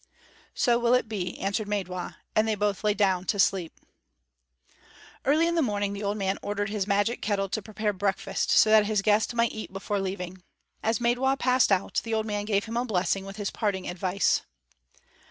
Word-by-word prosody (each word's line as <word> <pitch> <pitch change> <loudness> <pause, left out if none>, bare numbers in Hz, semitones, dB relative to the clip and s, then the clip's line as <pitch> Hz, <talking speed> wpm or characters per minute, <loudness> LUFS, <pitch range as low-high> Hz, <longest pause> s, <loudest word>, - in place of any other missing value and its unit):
"So 240 -1 +3
will 240 +1 +4
it 250 - +1
be," 190 -5 -4
answered 200 +2 -1
Maidwa; 185 -3 -3 0.2
and 215 +1 +3
they 220 - +1
both 205 -1 -1
lay 210 -1 +2
down 190 -3 +1
to 205 - -1
sleep. 190 -4 +1 1.5
Early 305 +4 +4
in 340 - +1
the 335 - +2
morning 205 -5 -1
the 200 - -6
old 205 0 -1
man 195 -1 -1
ordered 205 0 -2
his 205 -2 -2
magic 205 +4 +1
kettle 200 -2 -1
to 215 - -2
prepare 215 0 -2
breakfast, 195 0 -1
so 215 - +5
that 215 -1 +6
his 210 -2 +1
guest 215 +3 +2
might 235 0 +2
eat 220 -3 -7
before 195 +1 -3
leaving. 185 -1 -5 0.4
As 225 0 +1
Maidwa 250 +3 +2
passed 255 -3 +3
out, 195 -1 +1
the 225 -1 -2
old 220 0 0
man 205 -1 -2
gave 205 -2 +1
him 230 +1 -4
a 240 - +1
blessing 195 -2 0
with 195 0 -8
his 205 -1 -3
parting 200 -4 -2
advice. 185 +2 +1
205 Hz, 195 wpm, -27 LUFS, 195-220 Hz, 1.5 s, that